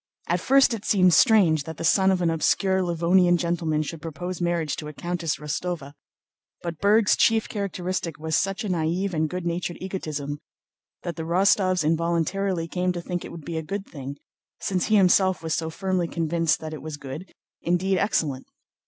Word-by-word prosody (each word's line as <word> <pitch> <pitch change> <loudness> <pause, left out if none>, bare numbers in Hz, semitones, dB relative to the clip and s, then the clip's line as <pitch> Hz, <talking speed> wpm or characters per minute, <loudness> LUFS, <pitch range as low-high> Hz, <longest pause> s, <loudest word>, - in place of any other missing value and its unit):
At 175 +1 +1
first 270 +6 +4
it 215 -3 -5
seemed 185 -3 +4
strange 175 - +5
that 160 -1 -7
the - - -5
son 190 +3 +4
of 185 -2 +1
an 165 - +2
obscure 190 +4 +2
Livonian 175 +1 +3
gentleman 165 -3 0
should 155 +1 -7
propose 175 +3 -5
marriage 170 -4 0
to 150 - -6
a 150 - -7
Countess 170 0 -2
Rostóva; 150 0 -4 0.7
but 170 -2 -5
Berg's 210 +1 +4
chief 225 -1 +3
characteristic 185 -5 -3
was 160 0 -2
such 195 +4 0
a - - -3
naïve 175 +3 -1
and 155 -1 0
good 180 +1 -4
natured 175 0 -2
egotism 150 -6 -4 0.6
that 170 -2 -5
the - - -3
Rostóvs 185 +1 +3
involuntarily 170 +3 0
came 180 +1 -1
to 175 - -4
think 175 0 -3
it - - -8
would 165 -4 -10
be 165 -1 -4
a - - -1
good 195 +5 -5
thing, 140 -1 -8 0.4
since 185 -2 -1
he 215 - +3
himself 190 -2 +4
was 160 -1 -1
so 160 +1 -1
firmly 185 0 -1
convinced 165 -1 0
that 155 0 -6
it 150 - -7
was 155 0 -6
good, 145 +6 -8 0.3
indeed 180 +2 +1
excellent. 145 -10 -1
175 Hz, 185 wpm, -25 LUFS, 160-185 Hz, 0.7 s, strange